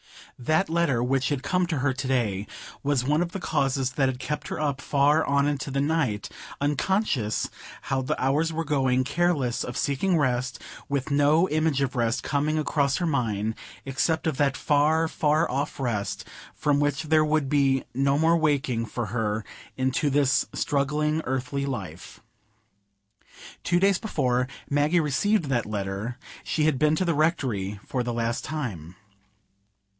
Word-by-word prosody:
That 155 Hz, +9 st, +1 dB
letter, 160 Hz, -8 st, +1 dB
which 130 Hz, +1 st, +1 dB
had 140 Hz, -3 st, -2 dB
come 180 Hz, +1 st, +1 dB
to 165 Hz, -3 st, -1 dB
her 130 Hz, 0 st, +1 dB
to 135 Hz, +1 st, -4 dB
day, 110 Hz, -6 st, 0 dB, 0.3 s
was 140 Hz, -3 st, +1 dB
one 150 Hz, +5 st, +2 dB
of 175 Hz, 0 st, -2 dB
the 195 Hz, -, -3 dB
causes 135 Hz, -5 st, 0 dB
that 135 Hz, 0 st, +1 dB
had 130 Hz, -, -3 dB
kept 150 Hz, +3 st, -4 dB
her -, -, -4 dB
up 140 Hz, -3 st, -1 dB
far 145 Hz, +3 st, +3 dB
on 140 Hz, 0 st, +2 dB
into 145 Hz, -1 st, -2 dB
the 140 Hz, 0 st, -1 dB
night, 140 Hz, -8 st, 0 dB, 0.3 s
unconscious 145 Hz, -, 0 dB, 0.3 s
how 135 Hz, -1 st, -1 dB
the 130 Hz, -, -2 dB
hours 150 Hz, +5 st, +1 dB
were 165 Hz, +1 st, -2 dB
going, 130 Hz, -4 st, +2 dB
careless 140 Hz, -4 st, 0 dB
of 125 Hz, -, -5 dB
seeking 165 Hz, +6 st, +1 dB
rest, 130 Hz, -3 st, 0 dB, 0.3 s
with 140 Hz, +1 st, -2 dB
no 145 Hz, +5 st, +4 dB
image 155 Hz, -2 st, +1 dB
of 135 Hz, 0 st, -1 dB
rest 115 Hz, 0 st, 0 dB
coming 150 Hz, +2 st, 0 dB
across 145 Hz, -2 st, +1 dB
her 175 Hz, -, -1 dB
mind, 110 Hz, -8 st, 0 dB, 0.3 s
except 135 Hz, +5 st, 0 dB
of 160 Hz, -5 st, 0 dB
that 140 Hz, -2 st, +1 dB
far, 155 Hz, +3 st, +2 dB
far 155 Hz, +1 st, +1 dB
off 140 Hz, +3 st, -2 dB
rest 110 Hz, -6 st, -2 dB, 0.3 s
from 145 Hz, -1 st, +1 dB
which 145 Hz, +1 st, 0 dB
there 155 Hz, 0 st, +3 dB
would 155 Hz, -2 st, +1 dB
be 135 Hz, -2 st, +2 dB
no 140 Hz, +2 st, +2 dB
more 165 Hz, +2 st, +4 dB
waking 140 Hz, -7 st, +1 dB
for 120 Hz, +1 st, -3 dB
her 105 Hz, 0 st, -2 dB, 0.3 s
into 130 Hz, +3 st, +1 dB
this 140 Hz, -1 st, +2 dB
struggling 150 Hz, +2 st, 0 dB
earthly 135 Hz, +2 st, -2 dB
life. 95 Hz, -, -6 dB, 1.4 s
Two 175 Hz, 0 st, +2 dB
days 195 Hz, 0 st, +3 dB
before 125 Hz, -, 0 dB, 0.2 s
Maggie 145 Hz, +4 st, +2 dB
received 170 Hz, +6 st, +1 dB
that 125 Hz, -5 st, 0 dB
letter, 105 Hz, +3 st, -3 dB, 0.3 s
she 155 Hz, -, -1 dB
had 150 Hz, -4 st, +2 dB
been 155 Hz, 0 st, +3 dB
to 185 Hz, -, 0 dB
the 170 Hz, -, +2 dB
Rectory 130 Hz, -, 0 dB
for 130 Hz, -, -2 dB
the 120 Hz, 0 st, -2 dB
last 115 Hz, 0 st, -1 dB
time. 105 Hz, -, -5 dB
140 Hz, 165 wpm, -26 LUFS, 125-155 Hz, 1.4 s, no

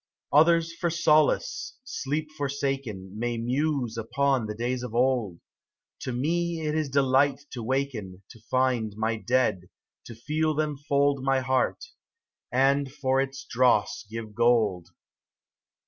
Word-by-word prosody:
Others 165 Hz, +2 st, +4 dB
for 170 Hz, 0 st, -1 dB
solace, 155 Hz, -2 st, +2 dB
sleep 155 Hz, -, -3 dB
forsaken. 135 Hz, -9 st, -3 dB
May 120 Hz, 0 st, -1 dB
muse 125 Hz, 0 st, -1 dB
upon 125 Hz, +1 st, 0 dB
the 105 Hz, -, -5 dB
days 120 Hz, +2 st, -2 dB
of 125 Hz, -2 st, -6 dB
old; 120 Hz, -8 st, +1 dB, 0.6 s
To 130 Hz, -, -4 dB
me 165 Hz, +6 st, -1 dB
it 150 Hz, -1 st, -1 dB
is 155 Hz, -2 st, -1 dB
delight 140 Hz, +1 st, +2 dB
to 125 Hz, -, -6 dB
waken, 110 Hz, -7 st, -3 dB
To 115 Hz, -, -15 dB
find 125 Hz, -5 st, +1 dB
my 110 Hz, +1 st, 0 dB
Dead, 115 Hz, -6 st, 0 dB, 0.4 s
to 115 Hz, -, -9 dB
feel 155 Hz, +6 st, -1 dB
them 150 Hz, -1 st, -1 dB
fold 140 Hz, -1 st, +1 dB
My 135 Hz, -1 st, +2 dB
heart, 130 Hz, 0 st, 0 dB, 0.7 s
and 135 Hz, +2 st, +2 dB
for 135 Hz, -2 st, +1 dB
its 135 Hz, 0 st, -5 dB
dross 120 Hz, -1 st, +2 dB
give 110 Hz, -1 st, -7 dB
gold. 110 Hz, -6 st, +2 dB
130 Hz, 130 wpm, -27 LUFS, 115-145 Hz, 0.7 s, Others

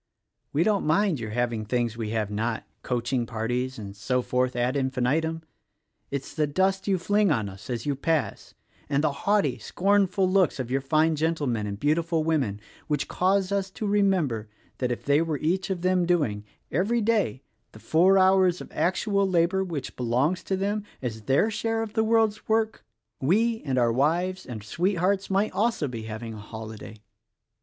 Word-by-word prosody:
We 155 Hz, -, +2 dB
don't 205 Hz, 0 st, +2 dB
mind 170 Hz, 0 st, +2 dB
your 110 Hz, -1 st, -5 dB
having 120 Hz, -1 st, -1 dB
things 120 Hz, 0 st, -1 dB
we 110 Hz, -2 st, -4 dB
have 110 Hz, -2 st, -1 dB
not 110 Hz, +2 st, -2 dB
— -, -, -46 dB
coaching 120 Hz, 0 st, 0 dB
parties 125 Hz, +3 st, -2 dB
and 100 Hz, -2 st, -8 dB
so 125 Hz, +5 st, -1 dB
forth 125 Hz, 0 st, 0 dB
ad 120 Hz, +2 st, 0 dB
infinitum, 140 Hz, +5 st, 0 dB, 0.3 s
— -, -, -50 dB
it's 140 Hz, -1 st, -5 dB
the 150 Hz, -2 st, +1 dB
dust 190 Hz, +6 st, 0 dB
you 195 Hz, -2 st, +3 dB
fling 205 Hz, +3 st, +2 dB
on 110 Hz, -8 st, 0 dB
us 95 Hz, +3 st, -11 dB
as 120 Hz, -2 st, -3 dB
you 145 Hz, -1 st, 0 dB
pass 155 Hz, +2 st, -2 dB, 0.3 s
(and 140 Hz, +1 st, +1 dB
the 155 Hz, -, +2 dB
haughty, 200 Hz, +8 st, +1 dB
scornful 195 Hz, 0 st, +2 dB
looks 185 Hz, -5 st, +2 dB
of 125 Hz, -1 st, -4 dB
your 135 Hz, +1 st, +1 dB
fine 155 Hz, +3 st, +2 dB
gentlemen 145 Hz, -9 st, -1 dB
and 100 Hz, 0 st, -5 dB
beautiful 160 Hz, +3 st, +1 dB
women) 140 Hz, -11 st, 0 dB, 0.3 s
which 150 Hz, -2 st, -1 dB
cause 190 Hz, +1 st, +1 dB
us 195 Hz, -1 st, 0 dB
to 215 Hz, -, -6 dB
remember 185 Hz, -, +1 dB, 0.3 s
that 125 Hz, -1 st, 0 dB
if 120 Hz, -, -4 dB
they 145 Hz, +2 st, +4 dB
were 160 Hz, -3 st, -1 dB
each 180 Hz, +7 st, -1 dB
of 180 Hz, -2 st, -3 dB
them 185 Hz, -1 st, +2 dB
doing 120 Hz, -13 st, +1 dB
— -, -, -45 dB
every 230 Hz, +5 st, +1 dB
day 210 Hz, -, +1 dB
— 115 Hz, -, -47 dB
the -, -, -12 dB
four 180 Hz, -, +4 dB
hours 185 Hz, -1 st, +4 dB
of -, -, -10 dB
actual 200 Hz, +2 st, +1 dB
labor 180 Hz, +2 st, +2 dB
which 165 Hz, -7 st, -5 dB
belongs 130 Hz, +9 st, 0 dB
to 190 Hz, -, -1 dB
them 205 Hz, +2 st, -1 dB, 0.2 s
as 110 Hz, -3 st, -4 dB
their 140 Hz, -, +3 dB
share 225 Hz, +1 st, -1 dB
of 215 Hz, -1 st, -7 dB
the 220 Hz, -, +2 dB
world's 220 Hz, -1 st, +2 dB
work, 220 Hz, 0 st, +1 dB, 0.4 s
we 220 Hz, -, +2 dB
and 130 Hz, -2 st, -1 dB
our 120 Hz, -2 st, +3 dB
wives 175 Hz, +8 st, 0 dB
and 110 Hz, -4 st, -6 dB
sweethearts 185 Hz, -, 0 dB
might 200 Hz, +2 st, +1 dB
also 220 Hz, -8 st, 0 dB
be 115 Hz, -4 st, -6 dB
having 110 Hz, +1 st, -6 dB
a 110 Hz, -, -8 dB
holiday. 110 Hz, 0 st, -9 dB
155 Hz, 185 wpm, -26 LUFS, 120-190 Hz, 0.4 s, they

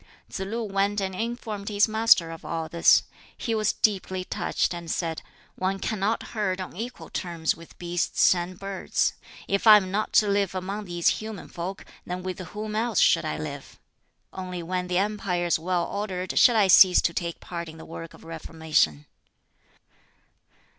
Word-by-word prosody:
Tsz -, -, -5 dB
lu 215 Hz, +5 st, -3 dB
went 200 Hz, 0 st, 0 dB
and 190 Hz, -1 st, -2 dB
informed 220 Hz, -1 st, -4 dB
his 205 Hz, +1 st, +3 dB
Master 220 Hz, -6 st, +4 dB
of 165 Hz, -, -9 dB
all 165 Hz, -1 st, -3 dB
this. 170 Hz, +1 st, +5 dB, 0.3 s
He 230 Hz, -, -2 dB
was 215 Hz, -1 st, +2 dB
deeply 190 Hz, -3 st, 0 dB
touched, 180 Hz, -, -1 dB
and 170 Hz, -1 st, -7 dB
said, 165 Hz, -2 st, -2 dB, 0.3 s
"One 190 Hz, +1 st, -1 dB
cannot 210 Hz, +2 st, -1 dB
herd 200 Hz, -4 st, -1 dB
on 185 Hz, -, -6 dB
equal 235 Hz, +6 st, -7 dB
terms 170 Hz, -3 st, -1 dB
with 165 Hz, 0 st, -15 dB
beasts 175 Hz, +1 st, +2 dB
and 180 Hz, 0 st, -4 dB
birds: 195 Hz, -1 st, -1 dB, 0.3 s
if 200 Hz, +3 st, 0 dB
I 215 Hz, -1 st, +11 dB
am 190 Hz, -2 st, -2 dB
not 215 Hz, +2 st, -1 dB
to 210 Hz, -, +5 dB
live 200 Hz, -2 st, +1 dB
among 195 Hz, +3 st, -4 dB
these 175 Hz, -2 st, -1 dB
human 215 Hz, -3 st, -7 dB
folk, 180 Hz, +3 st, -6 dB, 0.2 s
then 180 Hz, 0 st, -5 dB
with 185 Hz, 0 st, -4 dB
whom 210 Hz, +4 st, -6 dB
else 235 Hz, +2 st, +1 dB
should -, -, +4 dB
I -, -, -2 dB
live? -, -, -7 dB, 0.5 s
Only 180 Hz, -2 st, -5 dB
when 180 Hz, +1 st, -2 dB
the 180 Hz, 0 st, 0 dB
empire 195 Hz, -3 st, 0 dB
is 170 Hz, -2 st, +2 dB
well 175 Hz, +1 st, 0 dB
ordered 190 Hz, -3 st, -2 dB
shall 240 Hz, -, +6 dB
I 215 Hz, -2 st, +5 dB
cease 185 Hz, 0 st, +8 dB
to 170 Hz, -, +1 dB
take 170 Hz, -1 st, -3 dB
part 170 Hz, -2 st, -6 dB
in 160 Hz, -, -11 dB
the 160 Hz, -, -11 dB
work 165 Hz, 0 st, -9 dB
of -, -, -17 dB
reformation." 160 Hz, -, -1 dB
185 Hz, 175 wpm, -26 LUFS, 175-210 Hz, 0.5 s, I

